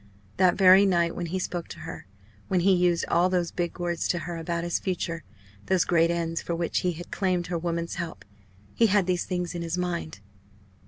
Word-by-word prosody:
That 180 +3 +4
very 190 0 +7
night 170 -2 +2
when 175 - -3
he 180 +3 -2
spoke 175 -2 -3
to 155 - -10
her, 160 -10 -8 0.4
when 185 -2 +1
he 195 +2 +4
used 175 -1 +2
all 175 +2 +3
those 175 -2 0
big 175 -1 -3
words 175 -1 -1
to 175 - 0
her 170 +1 -5
about 170 +1 -3
his 175 0 -1
future, 170 -3 -3 0.4
those 190 -2 +3
great 170 -1 +3
ends 170 -1 -1
for 170 - -3
which 170 -1 -1
he 180 -1 0
had 175 +1 -10
claimed 185 -3 0
her - - +1
woman's 170 0 -2
help 170 -2 -7 0.5
he 230 - +4
had 205 -2 +3
these 180 -1 0
things 180 -2 -3
in 175 - -4
his 170 +1 -3
mind. 175 -5 -3
175 Hz, 210 wpm, -26 LUFS, 170-180 Hz, 0.5 s, very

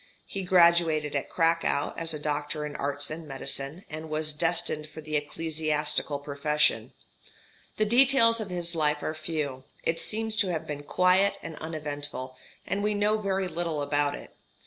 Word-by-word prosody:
He 195 - -5
graduated 170 -4 +4
at 140 - -2
Cracow 165 -3 +1
as 165 -1 0
doctor 150 0 -2
in 150 - -6
arts 145 +1 -1
and 160 0 -6
medicine, 140 +4 -4
and 155 +1 -7
was 155 0 0
destined 155 -1 0
for 155 - -10
the 155 0 -5
ecclesiastical 150 -1 -1
profession. 145 +1 0 0.8
The 215 - +3
details 235 -1 +6
of 205 - -5
his 175 -1 -1
life 150 -2 +1
are 155 - -2
few; 155 -4 -3 0.2
it 165 0 0
seems 220 0 -1
to 205 - +3
have 160 - -3
been 145 -1 -5
quiet 185 +6 +3
and 165 -1 -7
uneventful, 145 -4 -5 0.3
and 200 - -2
we 210 0 +1
know 210 +1 +2
very 195 -2 -1
little 165 -4 -2
about 145 0 +1
it. - - -11
155 Hz, 160 wpm, -28 LUFS, 150-180 Hz, 0.8 s, details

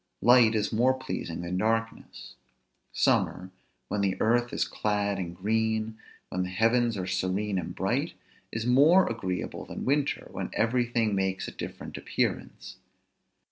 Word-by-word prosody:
Light 120 -2 +6
is 105 0 0
more 125 +4 +3
pleasing 130 -10 -5
than 90 +2 -2
darkness. 115 +1 -2 0.6
Summer, 95 +1 +1 0.4
when 105 - -1
the 95 -1 0
earth 120 +2 +2
is - - 0
clad 105 -1 -1
in 85 -2 -4
green, 110 +3 0 0.3
when 90 - -2
the 90 - -2
heavens 115 +3 +2
are 95 - -3
serene 95 +2 -1
and 85 - -6
bright, - - -1 0.4
is 110 0 -3
more 145 +10 +6
agreeable 95 -6 -3
than - - -7
winter, 140 +1 0
when - - -4
everything 115 -1 +1
makes 95 -1 -1
a - - -6
different - - -7
appearance. - - -3
110 Hz, 140 wpm, -28 LUFS, 95-120 Hz, 0.6 s, Light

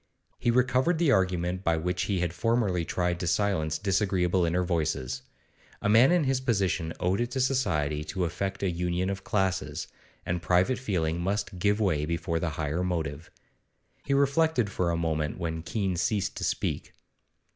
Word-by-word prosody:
He - - 0
recovered 130 +7 +3
the 160 -4 +3
argument 90 -2 +1
by 85 -2 +2
which 90 +3 -1
he 95 -4 0
had 85 -1 -1
formerly 110 -6 +1
tried 90 +1 -1
to 90 - -2
silence 80 -6 +1
disagreeable 95 -2 +1
inner 90 +2 +1
voices; 80 -7 -1 0.6
a 105 - -1
man 115 +7 +6
in 175 -2 +3
his 135 -1 +1
position 95 -9 0
owed 95 +5 +1
it 120 - -1
to 130 - -3
society 75 - +1
to 95 0 -2
effect 95 +3 -3
a 95 - +1
union 90 +2 -1
of 100 0 -5
classes, 95 -3 -1 0.4
and 85 0 -2
private 90 +10 +2
feeling 85 -8 -1
must 100 0 -2
give 105 +3 +2
way 80 -8 +1
before 85 0 -1
the 85 - -1
higher 80 +3 -1
motive. 80 -4 -3 0.7
He 140 - 0
reflected 140 -5 +2
for 90 -2 0
a 85 - 0
moment 80 -3 -1
when 80 -2 -3
Keene 95 +2 -2
ceased 100 +2 0
to - - -4
speak. - - -2
90 Hz, 170 wpm, -28 LUFS, 85-105 Hz, 0.7 s, man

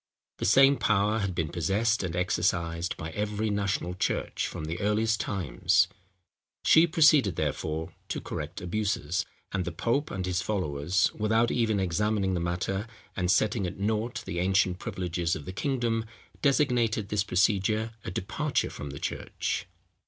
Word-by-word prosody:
The - - -1
same 135 +7 +6
power 105 +1 +2
had 100 -4 -2
been 80 -3 -1
possessed 105 +8 +1
and 90 -3 -3
exercised 85 -2 0
by 80 +1 -5
every 105 +2 -1
national 100 -3 -1
church 90 - -1
from 75 - -6
the 80 +2 -4
earliest 110 +2 +1
times. 85 - +2 0.8
She 165 +2 +7
proceeded, 150 - +5
therefore, 80 +1 -2 0.2
to - - -2
correct 75 +4 -6
abuses; 90 -3 -1 0.2
and 95 -2 -1
the 85 - -4
pope 120 - 0
and 95 -2 -3
his 90 -1 0
followers, 90 -2 0
without 110 +2 +2
even 110 -4 +1
examining 95 +2 +1
the 90 - 0
matter, 90 +4 -2 0.3
and 90 -2 -1
setting 105 0 +2
at 90 - -7
nought 110 +4 -1
the 85 - -3
ancient 95 0 +2
privileges 90 -2 -2
of 75 - -7
the 95 - -6
kingdom, 115 -2 -1 0.4
designated 120 -7 +2
this 105 -1 +1
procedure 105 +3 +1
a - - -4
departure - - -1
from 70 - -7
the 70 0 -7
church. - - -3
100 Hz, 150 wpm, -28 LUFS, 90-110 Hz, 0.8 s, She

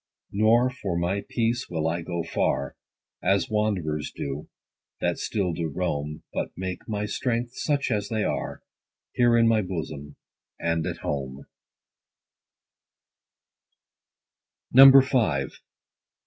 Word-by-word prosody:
Nor 115 +5 +3
for 100 -9 -3
my 90 +4 0
peace 120 +2 -1
will 80 -2 -1
I 85 +1 -1
go 85 0 -3
far, 70 -4 -1 0.5
As 100 +1 +1
wanderers 90 -9 -1
do, 70 +1 -5 0.5
that - - -1
still 95 -5 -1
do 80 0 -2
roam; 75 -2 -3
But - - -2
make 95 +1 -5
my 105 -1 -1
strengths, 120 +2 -2
such 145 -4 0
as 105 -2 -1
they 110 -2 0
are, 75 -3 -3 0.5
Here 120 -1 +4
in 115 0 +5
my 110 -1 +3
bosom, 80 -6 -6 0.4
and 85 -1 0
at - - -5
home. 70 -1 -4
95 Hz, 110 wpm, -26 LUFS, 80-110 Hz, 0.5 s, in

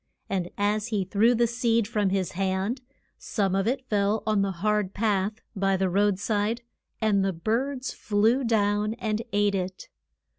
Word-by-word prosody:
And 180 -3 -1
as 210 +1 +1
he 210 -5 -1
threw 220 +6 +3
the 235 +1 +3
seed 230 -2 +1
from 210 -3 +1
his 190 -1 -1
hand, 195 +6 -1 0.4
some 195 -4 -1
of 195 +2 +1
it 260 +1 -1
fell 205 0 +1
on 215 -2 +2
the 195 - +1
hard 205 +1 0
path 205 -1 +1 0.2
by 195 -1 +1
the 190 0 +1
road 200 +1 +2
side, 210 +3 -1 0.4
and 210 -3 +2
the 195 - +1
birds 250 +9 -2
flew 220 +5 +2
down 210 -1 +1
and 220 -2 -2
ate 205 0 +2
it. 185 -1 -4
205 Hz, 170 wpm, -26 LUFS, 195-225 Hz, 0.4 s, threw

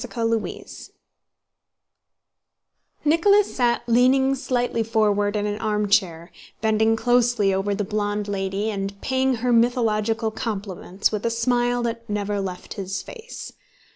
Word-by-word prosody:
CHAPTER 230 -1 0
V - - -7 2.4
Nicholas 395 +7 +4
sat 240 -2 +1
leaning 255 +3 +4
slightly 245 -3 -1
forward 210 -2 +1
in 210 0 0
an 210 0 -2
armchair, 205 -6 0 0.3
bending 220 0 +2
closely 240 -4 +2
over 195 +1 0
the 205 - -1
blonde 205 0 -2
lady 195 +2 -2
and 200 -1 -4
paying 260 0 +1
her 245 - +3
mythological 225 -2 +1
compliments 200 -3 -3
with 210 -1 -3
a 230 - +1
smile 240 +1 +1
that 230 -1 -4
never 205 -1 -1
left 185 -2 -6
his 195 -1 -4
face. 475 0 -9
220 Hz, 125 wpm, -23 LUFS, 205-245 Hz, 2.4 s, Nicholas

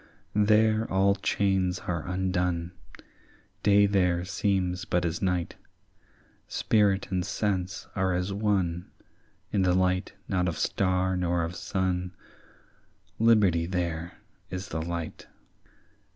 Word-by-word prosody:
"There 110 +1 +3
all 95 +1 +4
chains 95 -2 0
are 85 -2 -3
undone; 90 -2 -1 0.9
Day 100 0 +5
there 90 -3 +1
seems 95 -1 0
but 90 -4 0
as 85 0 -2
night; 90 -2 -1 0.9
Spirit 100 -3 +1
and 90 -1 0
sense 95 -2 -2
are 95 -1 +1
as 90 +2 -1
one 95 -4 0 0.6
In 100 - +1
the 90 -1 +3
light 90 +1 +1
not 90 -2 0
of 85 - -2
star 95 -1 +1
nor 90 -1 0
of 85 +2 -4
sun; 90 -1 -2 1.0
Liberty 100 -8 +4
there 85 -2 -3 0.4
is 90 +1 -5
the 80 - -3
light. 85 0 -5
90 Hz, 115 wpm, -27 LUFS, 90-100 Hz, 1.0 s, Day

